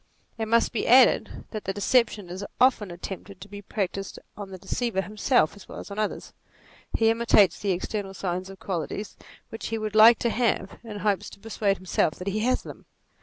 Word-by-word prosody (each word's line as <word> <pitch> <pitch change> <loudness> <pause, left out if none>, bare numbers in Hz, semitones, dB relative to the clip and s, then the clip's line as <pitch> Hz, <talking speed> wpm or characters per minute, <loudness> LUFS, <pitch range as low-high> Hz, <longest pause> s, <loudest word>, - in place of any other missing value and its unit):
It 220 - -1
must 230 +1 +3
be. 230 - -2
added 250 +1 +4
that 215 -2 -6
the 195 - -1
deception 210 -2 +1
is 185 +3 -5 0.2
often 250 -6 +3
attempted 185 +2 -8
to 200 - -10
be 205 0 -9
practised 195 -1 -4 0.2
on 205 -2 -7
the 190 - -8
deceiver 230 +1 -2
him 210 +2 -9
self 210 - +2
as 200 - -14
well - - -8
as - - -9
on 200 - -5
others; 215 - -3 0.6
he 225 0 +4
imitates 225 -4 +4
the 205 - -2
external 195 +2 -3
signs 185 0 -3
of 195 -1 -11
qualities 190 +3 -4 0.3
which 225 - -6
he 225 - -2
would 215 -1 -4
like 220 +2 +8
to 235 - 0
have, 225 -4 -1
in 215 -3 -7
hopes 205 -2 0
to - - -14
persuade 205 -2 -1
himself 180 -3 0
that 180 +2 -4
he 210 +2 -1
has 250 +4 +1
them. - - -11
205 Hz, 205 wpm, -26 LUFS, 195-225 Hz, 0.6 s, like